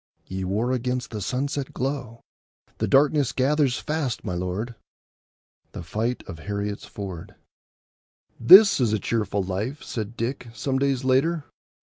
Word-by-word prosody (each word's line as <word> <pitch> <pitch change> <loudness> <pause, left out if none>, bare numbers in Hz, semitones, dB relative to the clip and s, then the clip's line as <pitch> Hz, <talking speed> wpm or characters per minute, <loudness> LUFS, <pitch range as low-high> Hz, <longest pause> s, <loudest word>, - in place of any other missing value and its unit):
Ye 95 0 -5
war 105 +7 0
against 125 0 -2
the 105 -2 -5
sunset 135 +5 -3
glow; 130 -3 -3 0.6
The - - 0
darkness 145 0 +3
gathers 135 -1 +2
fast, 150 -6 -3
my 90 - -2
lord. 90 +7 -3 1.0
—The - - -6
Fight 110 +8 -2
of 80 -4 -8
Heriot's 100 +2 -4
Ford. 100 0 -8 1.0
"This 195 - +9
is 115 -4 +2
a 110 - +1
cheerful 105 -2 -1
life," 105 +10 -4
said 110 0 -5
Dick, 120 +2 -3
some 130 +5 -1
days 135 -2 0
later. 145 +5 +2
120 Hz, 135 wpm, -25 LUFS, 100-135 Hz, 1.0 s, This